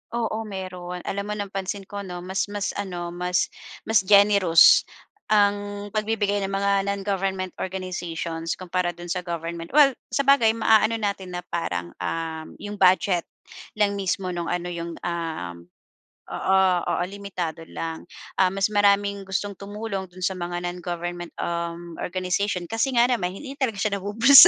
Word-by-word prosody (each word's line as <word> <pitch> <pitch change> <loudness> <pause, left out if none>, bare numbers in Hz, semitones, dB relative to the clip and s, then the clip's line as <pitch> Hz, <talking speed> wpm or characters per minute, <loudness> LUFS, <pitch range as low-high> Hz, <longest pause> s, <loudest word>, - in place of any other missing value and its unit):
Oo, 225 -1 -1
meron. 180 -2 -6
Alam 200 0 -2
mo, 210 - -2
napansin 195 -1 -4
ko, 200 +1 -7
'no, 180 -3 -6
mas 190 +2 -1
mas 205 -1 -2
ano, 175 -3 -4
mas 180 0 0 0.3
mas 220 -2 +4
generous 200 -5 +7 0.4
ang 205 -1 +1
pagbibigay 215 -1 0
ng 195 - -1
mga 200 0 +2
non-government 195 -2 -1
organizations 175 -3 -3
kumpara 180 -1 -2
do'n 175 0 -7
sa 185 - 0
government. 170 -1 -4
Well, 290 -2 +8 0.2
sabagay, 275 -5 +4
maano 220 0 +4
natin 200 -4 -3
na 175 - -4
parang, 85 +1 -3
um, 160 - -4
'yong 205 0 -7
budget 185 -1 +4 0.5
lang 200 -1 +2
mismo 185 -1 -1
no'ng 170 -1 -3
ano 175 0 -2
'yong, 170 -1 -5
um 165 - -3 0.7
oo, 190 0 +2 0.3
oo, - - +1
limitado 185 -5 -5
lang. 165 -1 -5 0.4
Ah, 190 - +6
mas 195 +1 +1
maraming 200 -1 +3
gustong 200 +1 -2
tumulong 200 -1 -4
do'n 185 +1 -9
sa 190 - +2
mga 175 0 -4
non-government, 175 0 -4
um, 170 0 -3
organization 185 +1 -1
kasi 240 +3 0
nga 235 +1 +6
naman 180 -7 0
hi, - - -8
hindi 275 0 -8
talaga 250 -5 +1
siya 200 -1 0
nabubulsa. 230 - +9
190 Hz, 150 wpm, -25 LUFS, 175-205 Hz, 0.7 s, nabubulsa